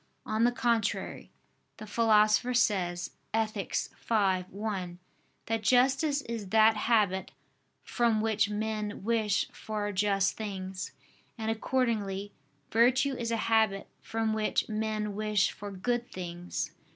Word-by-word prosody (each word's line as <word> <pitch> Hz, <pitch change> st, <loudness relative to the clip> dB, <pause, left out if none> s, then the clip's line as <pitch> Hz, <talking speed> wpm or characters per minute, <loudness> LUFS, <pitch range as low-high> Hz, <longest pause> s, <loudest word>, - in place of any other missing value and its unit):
On 220 Hz, +2 st, +1 dB
the 245 Hz, -, +4 dB
contrary, 235 Hz, -4 st, -1 dB, 0.5 s
the 215 Hz, -, -8 dB
Philosopher 215 Hz, +2 st, +3 dB
says 180 Hz, -7 st, +1 dB, 0.2 s
(Ethic. 215 Hz, -3 st, -1 dB
v, 195 Hz, -5 st, 0 dB
1) 190 Hz, -4 st, -4 dB, 0.5 s
that 225 Hz, 0 st, -1 dB
justice 270 Hz, +5 st, +3 dB
is 225 Hz, -4 st, -5 dB
that 220 Hz, +1 st, +5 dB
habit 210 Hz, -4 st, +1 dB, 0.5 s
"from 235 Hz, -3 st, +1 dB
which 215 Hz, -1 st, +1 dB
men 210 Hz, -1 st, -3 dB
wish 215 Hz, -2 st, +1 dB
for 210 Hz, -1 st, -4 dB
just 195 Hz, 0 st, +1 dB
things": 190 Hz, -3 st, -5 dB, 0.5 s
and 220 Hz, -1 st, -1 dB
accordingly, 215 Hz, -4 st, -1 dB, 0.4 s
virtue 255 Hz, +5 st, +4 dB
is 235 Hz, -3 st, -3 dB
a 230 Hz, -, 0 dB
habit 220 Hz, -3 st, +2 dB
from 225 Hz, -1 st, -1 dB
which 215 Hz, -1 st, 0 dB
men 215 Hz, -1 st, -2 dB
wish 210 Hz, -1 st, +1 dB
for 205 Hz, 0 st, -8 dB
good 240 Hz, +5 st, -2 dB
things. 175 Hz, -1 st, -5 dB
215 Hz, 120 wpm, -30 LUFS, 200-230 Hz, 0.5 s, that